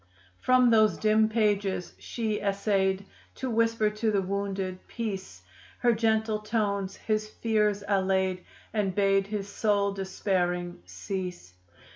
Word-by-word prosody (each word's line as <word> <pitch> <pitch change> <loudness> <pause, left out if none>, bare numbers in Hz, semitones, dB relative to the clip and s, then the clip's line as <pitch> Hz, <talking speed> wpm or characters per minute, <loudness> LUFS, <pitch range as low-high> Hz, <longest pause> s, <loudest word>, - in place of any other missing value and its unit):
From 255 -1 +4
those 215 -1 +4
dim 215 0 +3
pages 205 -5 0
she 220 -3 -2
essayed 195 -1 0 0.3
To 260 -2 -3
whisper 230 -1 +2
to 215 +1 -1
the 200 -2 +1
wounded, 195 -1 -3
"Peace!" 195 - -5 0.3
Her 240 -1 +3
gentle 220 -1 +1
tones 205 -3 -1
his 215 -1 -2
fears 210 -2 0
allayed 190 -2 +1 0.3
And 205 -4 0
bade 195 -1 +3
his 205 -1 -3
soul 200 -1 +1
despairing 180 - -2
cease. 175 - -5
200 Hz, 120 wpm, -28 LUFS, 190-215 Hz, 0.3 s, From